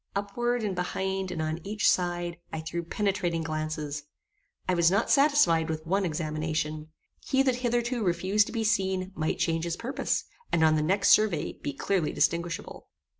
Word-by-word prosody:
Upward, 240 +4 -1
and 205 -2 -1
behind, 190 +1 -2
and 165 -3 -3
on 155 +1 -2
each 210 +2 0
side, 175 -1 +1
I 160 - -4
threw 160 +2 -3
penetrating 175 -2 -1
glances. 155 -2 -3 0.7
I 185 - +2
was 170 -1 +4
not 200 +5 +1
satisfied 275 - +4
with 155 0 -3
one 195 +3 +1
examination. 155 -1 -2 0.3
He 270 -1 +2
that 260 -2 +1
hitherto 240 -1 0
refused 190 +3 +2
to - - -6
be 225 -1 -1
seen, 190 -4 0
might 155 -2 -1
change 165 -1 0
his 170 0 -2
purpose, 250 +4 -1 0.3
and 160 - +3
on 155 0 +5
the 155 - +2
next 195 +6 +2
survey 200 -8 +3
be 145 - -5
clearly 175 +3 0
distinguishable. 170 +3 -1
180 Hz, 170 wpm, -28 LUFS, 160-205 Hz, 0.7 s, on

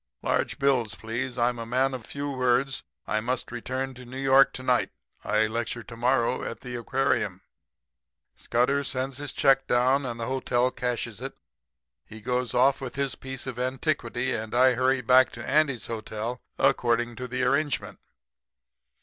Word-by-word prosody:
'Large - - 0
bills, 130 -6 +1
please. 120 +3 -4
I'm 120 0 +1
a 115 - -4
man 130 +3 +1
of 125 -3 -7
few 140 0 -4
words. 130 +1 +1 0.2
I 110 - 0
must 125 +3 -2
return 130 +2 -3
to 125 0 -11
New 125 +2 -9
York 135 0 +5
to 130 - -6
night. 125 -1 +2 0.3
I 105 +1 +2
lecture 115 +1 -3
to 115 - -10
morrow 125 +1 +1
at - - -6
the 125 - -7
aquarium.' 130 +3 0 0.9
"Scudder 130 +4 +1
sends 130 0 -3
a 145 - -5
check 135 0 +3
down 130 +3 +3
and 120 -1 -5
the 115 - -2
hotel 125 -1 +1
cashes 120 -4 -3
it. - - -6 0.7
He 110 - -11
goes 125 +1 -1
off 130 +2 +4
with 130 -2 -6
his 140 -2 -1
piece 130 -1 -7
of 125 -2 -5
antiquity 130 -1 -1
and 110 +1 -4
I 130 +1 +6
hurry 130 +1 +2
back 125 +2 +5
to 120 - -8
Andy's 140 -4 +2
hotel, 115 +2 -4 0.2
according 120 0 +2
to 125 - -4 0.2
arrangement. 140 +2 0
125 Hz, 165 wpm, -27 LUFS, 120-135 Hz, 0.9 s, I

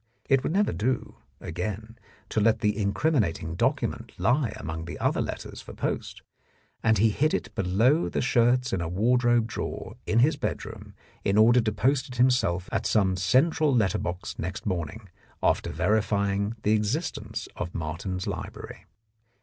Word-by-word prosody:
It 135 -2 +4
would 145 - -2
never 200 +4 +2
do, 115 +8 -2 0.2
again, 105 +7 -5 0.3
to - - 0
let 110 +1 +3
the 105 -1 +2
incrimin 110 +7 +1
ating 80 -2 -4
document 85 - -1
lie 125 0 +2
among 80 0 -5
the 85 - -6
other - - +1
letters - - -5
for - - -11
post, - - -4 0.6
and 110 0 +3
he 110 +3 +4
hid 155 +8 +1
it - - -4
below 110 - +2
the - - -2
shirts 125 +1 +2
in 95 - 0
a 85 - -3
wardrobe 120 +4 +3
drawer 115 - -5
in 110 - +1
his 145 +5 +4
bedroom 140 - -5 0.3
in 100 +1 +1
order 120 +3 +6
to 110 -1 0
post 130 - +1
it 125 - -8
himself 120 -8 +2
at - - 0
some 95 -4 +2
central 135 - +3
letter 100 -6 +2
box 90 +1 -5
next 90 +3 -4
morning 95 +2 -3 0.4
after - - +2
verifying 100 0 0
the 105 - +2
existence 110 0 -2
of 85 0 -5
Martin's 85 +4 -3
Library. - - -6
110 Hz, 160 wpm, -27 LUFS, 95-125 Hz, 0.6 s, order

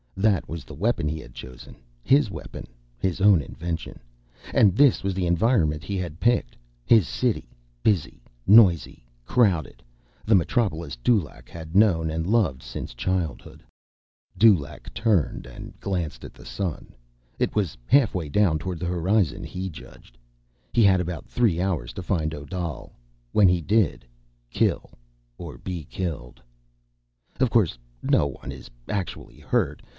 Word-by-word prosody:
That 100 -2 +2
was 85 0 -7
the - - -11
weapon 105 -7 0
he 80 +1 -2
had - - -12
chosen, 65 0 -11 0.3
his 140 -4 +4
weapon, - - -8 0.3
his 95 0 -1
own 100 -5 +6
invention. 80 +4 -6 0.5
And 100 -3 +5
this 140 -3 +4
was 95 0 0
the 90 -1 -1
environment 85 -4 +2
he 100 - -4
had 85 -4 -5
picked: 120 +1 +1 0.3
his 110 -9 +5
city, - - -1 0.3
busy, 95 - 0 0.2
noisy, 95 - +5 0.2
crowded, 90 - +1 0.4
the 110 - +4
metropolis 85 - 0
Dulaq 65 - -1
had 80 0 -9
known 90 -6 +4
and 80 +1 -2
loved 100 - +1
since - - -7
childhood. 85 +4 -3 0.7
Dulaq 85 -10 +3
turned 100 -6 0
and - - -11
glanced 85 -10 -3
at - - -10
the 60 - -15
sun. 75 +8 -5 0.5
It - - 0
was 100 -8 -1
halfway 110 - +3
down 80 0 +2
toward 90 0 -5
the 90 - -3
horizon, 90 +1 +1
he 95 +1 -5
judged. 70 -6 -14 0.5
He 115 - +3
had 95 -2 +5
about 90 -3 -4
three 110 -9 +1
hours 90 -10 -2
to 95 - -6
find 80 -3 -1
Odal. 85 +2 -6 0.4
When 105 -3 +5
he 90 -1 +2
did—kill - - -1 0.5
or 80 -7 -8
be 90 +3 -6
killed. 75 -9 -5 1.0
_Of 130 -2 +3
course 100 - +2 0.3
no 75 - +3
one 65 - -6
is 65 -3 -11 0.2
actually 100 -3 -5
hurt. - - -1
90 Hz, 140 wpm, -25 LUFS, 75-100 Hz, 1.0 s, own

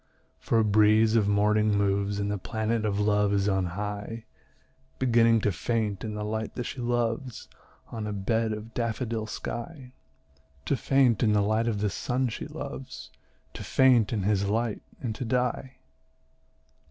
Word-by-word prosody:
For 115 - 0
a 110 - +4
breeze 110 +1 +4
of 105 -3 +3
morning 105 +1 +2
moves, 100 0 0
And 100 0 -1
the 105 - -2
planet 110 +2 -2
of 105 -1 0
Love 105 -1 +2
is 100 0 +1
on 95 -2 +1
high, 105 +2 -5 0.7
Beginning 115 -2 +4
to 105 - +1
faint 105 +2 -2
in 110 -2 -4
the 105 - -4
light 110 +1 -3
that 125 - -3
she 125 +2 -6
loves 120 0 -2 0.4
On 110 -2 -4
a - - -3
bed 110 +3 0
of 110 +1 -6
daffodil 115 -1 -2
sky, 125 +4 -6 0.7
To - - +1
faint 130 -4 +2
in 110 -3 +3
the 105 - +3
light 110 +3 +1
of 105 -3 -1
the 105 - +1
sun 125 +4 -1
she 110 - -6
loves, - - -8 0.4
To - - -7
faint 125 -5 +4
in 105 -4 -1
his 100 0 +1
light, 110 +1 -1 0.2
and 115 -4 -2
to 110 - -5
die. 125 +2 -1
110 Hz, 165 wpm, -27 LUFS, 105-115 Hz, 0.7 s, a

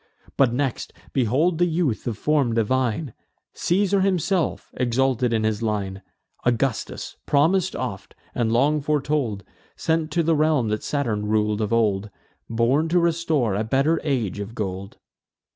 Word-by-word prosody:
But 135 -4 +4
next 130 0 -2 0.2
behold 140 +8 +2
the 175 - +4
youth 160 -10 -1
of 115 -4 -2
form 140 -6 +1
divine, 125 +3 0 0.4
Caesar 195 +2 +1
himself, 185 -2 0
exalted 125 0 +1
in 110 -1 +1
his 110 -1 0
line; 100 -3 -2 0.4
Augustus, 120 0 -1
promis'd 175 +6 +2
oft, 95 -7 -5 0.2
and 115 -2 0
long 145 +6 +2
foretold, 145 -8 -1 0.3
Sent 160 -1 0
to 170 - +2
the 165 0 +2
realm 150 -6 +2
that 105 0 -1
Saturn 115 -8 -1
rul'd 105 0 +1
of 105 - -1
old; 105 -3 +1 0.4
Born 125 +8 +2
to 175 - +2
restore 160 - +1
a 105 +3 0
better 135 +8 +1
age 120 - -1
of 105 +3 -6
gold. 95 -2 -5
130 Hz, 145 wpm, -23 LUFS, 110-155 Hz, 0.4 s, But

